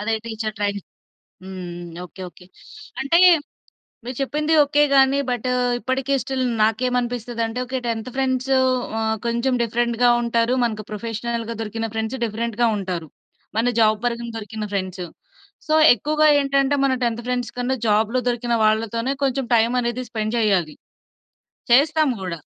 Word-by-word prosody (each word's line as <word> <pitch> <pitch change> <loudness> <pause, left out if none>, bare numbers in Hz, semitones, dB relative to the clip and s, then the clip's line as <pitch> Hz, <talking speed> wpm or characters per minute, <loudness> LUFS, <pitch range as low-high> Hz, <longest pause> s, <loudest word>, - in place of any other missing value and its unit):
అదే 220 +2 0
teacher 220 -1 -4
training. 200 -1 -2 0.6
హ్మ్. 190 - -8 0.2
హ్మ్. 175 -1 -8
ఓకే. 190 - -11
ఓకే. 180 +2 -18 0.5
అంటే, 275 +6 +3 0.9
మీరు 250 +1 -6
చెప్పింది 300 +3 -1
ఓకే. 290 +1 +2
గానీ, 270 +1 +5
బటూ 250 +1 -1 0.3
ఇప్పడికీ 265 +2 -2
స్టిల్ 265 -1 -2 0.2
నాకేమనిపిస్తదంటే, 240 0 -1
ఓకే 260 +1 -3
10థ్ 230 +2 -3
ఫ్రెండ్స్ 265 0 0 0.5
ఆహ్, 220 0 0
కొంచెం 235 +3 0
డిఫరెంట్‌గా 235 +1 +1
ఉంటారు. 235 +1 +1
మనకు 215 -3 -3
ప్రొఫెషనల్‌గా 230 +1 -4
దొరికిన 225 +1 -4
ఫ్రెండ్స్ 220 +3 -3
డిఫరెంట్‌గా 230 +1 -1
ఉంటారు, 180 -5 -4 0.5
మన 235 +2 +2
జాబ్ 215 -1 +4
పరంగా 235 -1 -2
దొరికిన 215 0 -6
ఫ్రెండ్స్. 185 -2 -3 0.6
సో, 310 - +2 0.2
ఎక్కువుగా 305 +6 +2
ఏంటంటే, 275 0 +1
మనం 260 -1 +1
10థ్ 235 0 -1
ఫ్రెండ్స్ 245 -1 -2
కన్నా, 250 +2 0
జాబ్‌లో 220 +4 +2
దొరికిన 240 0 -1
వాళ్ళతోనే 230 +4 +1
కొంచెం 270 0 0
టైమనేది 240 +2 +1
స్పెండ్ 215 -1 -2
జెయ్యాలి. 190 -8 +1 1.0
చేస్తాం 300 +3 +4
గూడా. 175 -3 -4
235 Hz, 135 wpm, -22 LUFS, 215-255 Hz, 1.0 s, గానీ